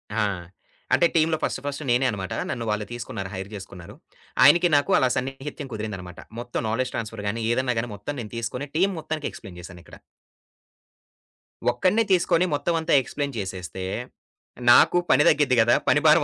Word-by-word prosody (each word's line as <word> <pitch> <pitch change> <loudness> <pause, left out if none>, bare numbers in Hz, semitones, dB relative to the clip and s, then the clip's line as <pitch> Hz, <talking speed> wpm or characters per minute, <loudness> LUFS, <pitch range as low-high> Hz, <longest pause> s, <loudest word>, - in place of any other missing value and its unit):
ఆ! - - 0 0.7
అంటే - - +5
టీమ్‌లో 160 0 +3
ఫస్ట్ - - -1
ఫస్ట్ 145 +1 -4
నేనే 120 +2 +3
అన్నమాట. 95 -4 -4 0.2
నన్ను 120 -2 -3
వాళ్ళు 105 0 -1
తీసుకున్నారు 110 -5 -5
హైర్ 95 0 -6
చేసుకున్నారు. 95 -3 -10 0.5
ఆయనకి 170 +6 +7
నాకు 145 +7 +2
అలా 130 - +3
సన్నిహిత్యం 135 +2 -5
కుదిరిందన్నమాట. 100 -5 -6 0.2
మొత్తం 120 0 -4
నాలెడ్జ్ 125 +3 -1
ట్రాన్స్‌ఫర్ 110 -2 -5
గాని 115 +3 -2
ఏదైనా 125 0 0
గాని 120 +1 -3
మొత్తం 105 +9 -6
నేను 105 - -9
తీసుకొని 125 +5 -4
టీమ్ 190 +4 +2
మొత్తానికి 155 -1 -4
ఎక్స్‌ప్లే‌యిన్ 90 -2 -11
చేశానిక్కడ. 90 -1 -12 1.7
ఒక్కడినే 185 - +2
తీసుకొని 175 -1 +3
మొత్తం 145 +4 0
అంతా 160 - 0
ఎక్స్‌ప్లేయిన్ 140 +1 -4
చేసేస్తే, 95 -3 -5 0.9
నాకు 175 - +6
పని 150 - +5
తగ్గిద్ది 140 -4 +4
గదా! 115 +1 +5
పని 145 - +5
భారం 155 +2 +6
125 Hz, 155 wpm, -24 LUFS, 105-150 Hz, 1.7 s, ఆయనకి